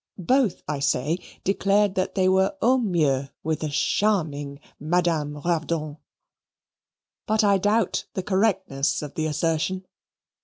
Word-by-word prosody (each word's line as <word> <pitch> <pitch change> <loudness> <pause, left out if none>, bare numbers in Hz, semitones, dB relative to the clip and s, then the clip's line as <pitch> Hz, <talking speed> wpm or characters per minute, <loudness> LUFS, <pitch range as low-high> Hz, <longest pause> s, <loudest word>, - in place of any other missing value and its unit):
both, 240 +3 +1
I 150 -2 -2
say, 140 +4 0 0.2
declared 200 +1 +2
that 185 0 -2
they 190 -1 +3
were 190 +8 +2
au 255 +2 +3
mieux 150 - +1
with 160 0 -1
the 155 - -3
charming 145 -5 0 0.2
Madame 160 -2 0
Ravdonn. 160 -2 -2 1.3
But 215 0 +2
I 200 -1 +4
doubt 205 +1 +1
the 190 - -2
correctness 190 -9 0
of 145 - -7
the 155 0 -1
assertion. 165 +4 -1
175 Hz, 125 wpm, -24 LUFS, 150-195 Hz, 1.3 s, I